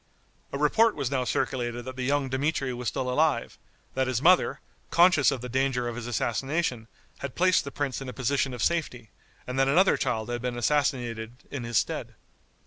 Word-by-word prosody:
A - - -3
report 215 +10 +3
was 140 -3 -2
now 130 -2 0
circulated 120 -2 -2
that 130 0 -6
the 130 - -5
young 140 +2 +1
Dmitri 135 0 -1
was 120 0 -5
still 130 - -2
alive, 135 -1 +1 0.3
that 130 0 0
his 130 -2 0
mother, 180 +6 +4 0.3
conscious 170 -4 +5
of 135 -4 -2
the 125 - -5
danger 130 -1 0
of 120 - -4
his 120 0 -6
assassination, 125 +1 -1 0.3
had 140 -2 -6
placed 185 -3 +3
the 140 - -6
prince 140 -2 -3
in 135 - -6
a - - -4
position 135 +1 0
of 120 - -3
safety, 125 -10 -1 0.3
and 125 +1 -3
that 135 - +4
another 180 +8 +4
child 110 +1 -1
had 120 -1 -3
been 125 -1 -3
assassinated 120 -4 0 0.2
in 130 -4 -4
his 115 -2 0
stead. - - -2
130 Hz, 195 wpm, -27 LUFS, 120-145 Hz, 0.3 s, conscious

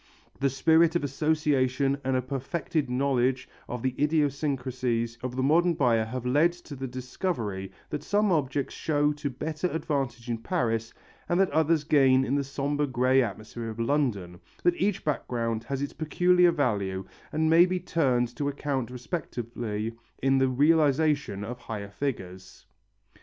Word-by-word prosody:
The 140 0 +2
spirit 160 +5 +4
of 170 - +1
association 140 -2 +1
and 130 0 0
a 130 - 0
perfected 140 +2 -2
knowledge 130 0 +1 0.2
of 125 -1 -5
the 130 -1 0
idiosyncrasies 130 -6 0
of 125 0 -4
the 130 - 0
modern 170 +5 +3
buyer 115 -6 +2
have 125 +2 -5
led 150 +7 +3
to 175 -4 -11
the 135 0 -5
discovery 125 - -4 0.2
that 150 - -3
some 205 -1 +1
objects 140 -4 0
show 150 -1 +1
to 145 -1 -4
better 155 +6 -3
advantage 135 -8 -2
in 115 -1 -2
Paris 115 -7 -1 0.4
and 175 - +2
that 195 -4 +3
others 160 0 +2
gain 135 -3 +4
in 130 - -1
the 140 0 +1
sombre 145 +2 -1
grey 130 +1 +3
atmosphere 115 +1 -5
of 110 +1 -8
London, 115 -9 0 0.2
that 175 - +4
each 195 0 0
background 115 -6 -1
has 135 +2 -3
its 140 - -4
peculiar 175 +3 +3
value 100 - -1 0.3
and 160 +1 +1
may 165 +3 +6
be 185 0 -1
turned 135 -9 0
to 145 -1 0
account 140 -4 -2
respectively 120 -5 -4 0.3
in 135 0 +4
the 130 - +3
realization 145 -4 +2
of 125 +3 -6
higher 100 -4 -6
figures. 95 -7 -5
135 Hz, 155 wpm, -27 LUFS, 120-155 Hz, 0.4 s, may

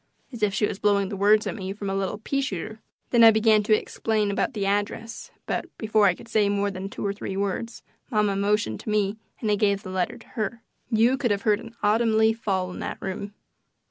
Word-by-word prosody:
as 235 - -8
if 210 -1 +3
she 210 +2 +1
was 195 - -4
blowing 200 -2 +2
the - - -4
words 210 +2 +4
at - - -2
me 190 -3 -5
from 200 0 -6
a 195 - -1
little 195 +1 -2
peashooter. 220 -4 -3 0.3
Then 235 -1 +6
I 225 - +11
began 220 -1 +4
to 215 +1 +3
explain 215 -2 -1
about 200 - -1
the 200 -2 -1
address, 205 +3 -2 0.2
but - - -2
before 215 -2 +3
I 180 - +2
could - - -14
say 210 -3 +2
more 200 0 0
than 190 +1 -6
two - - -6
or 200 - 0
three 195 -1 -5
words 200 +4 -3 0.3
mamma 210 -4 +1
motioned 200 - 0
to - - -7
me 210 0 +1 0.2
and 215 -3 0
I - - +4
gave 200 0 +1
the 185 - -7
letter 185 -1 -1
to - - -17
her. 230 0 -4 0.3
You 235 +3 +3
could 260 -4 0
have 200 -1 0
heard 210 -1 +3
an 230 0 -11
autumn 220 +1 +3
leaf 220 +1 +3
fall 190 -4 -1
in - - -8
that - - -4
room. 200 +2 -5
210 Hz, 235 wpm, -25 LUFS, 200-220 Hz, 0.3 s, I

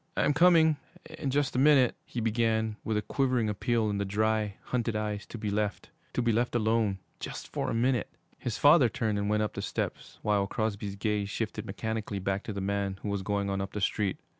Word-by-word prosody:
'I'm 145 - +3
coming 160 -1 +5 0.4
in 145 -4 -1
just 140 0 0
a - - +2
minute,' 135 -3 +5
he 120 - -5
began, 110 -1 +1
with 110 -1 0
a 105 - -1
quivering 130 -5 +1
appeal 110 +2 0
in 100 -1 -1
the - - +1
dry, 105 +1 0
hunted 120 -3 -1
eyes 105 -1 -2
to - - -7
be 105 -2 -3
left 105 0 -2 0.2
to 125 - 0
be 120 - +3
left 120 +2 0
alone 110 -3 +2 0.2
just - - -6
for - - -2
a - - -1
minute! 125 0 +1 0.3
His 115 - -3
father 145 -4 +6
turned 110 -4 -1
and 100 0 -1
went 105 0 +2
up 105 - -2
the - - -4
steps, - - -4
while 100 -2 +2
Crosby's 100 -2 -2
gaze 105 0 -1
shifted 110 0 -3
mechanically 110 0 -3
back 95 +1 -1
to - - -4
the 100 -1 -4
man 100 0 -1
who 105 - -2
was 100 -1 -1
going 100 +1 -1
on 95 0 -1
up 95 0 -5
the 105 - -2
street. 100 -1 0
110 Hz, 215 wpm, -29 LUFS, 100-120 Hz, 0.4 s, father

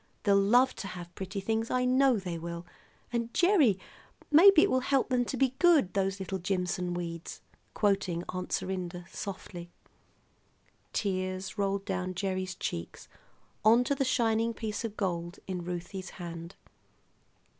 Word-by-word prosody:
They'll 200 -1 +4
love 245 +6 +4
to 195 - -5
have 175 -2 -8
pretty 190 +1 -5
things; 225 +3 -1
I 250 0 +1
know 260 -1 +4
they 180 -4 -4
will. 170 +1 -6 0.5
And, 235 0 -1
Gerry, 345 - +4 0.5
maybe 335 +2 +8
it - - +2
will 260 - +3
help 270 0 +1
them 250 -1 +2
to 260 - -3
be 265 0 +2
good, 325 - +5
those 195 0 0
little 190 0 -3
Jimson 180 -1 -1
weeds," 170 -1 -5 0.4
quoting 195 -4 +1
Aunt 185 0 -4
Serinda 180 -2 -3
softly. 175 -3 -7 1.2
Tears 185 -2 -2
rolled 200 0 0
down 185 -1 -3
Gerry's 185 -1 -2
cheeks 85 0 -5 0.6
onto 235 +5 +5
the 275 - 0
shining 230 -3 +1
piece 215 0 -4
of 220 -2 -5
gold 175 -2 -2
in 180 -2 -4
Ruthie's 180 +2 -5
hand. 170 0 -8
195 Hz, 145 wpm, -30 LUFS, 180-235 Hz, 1.2 s, maybe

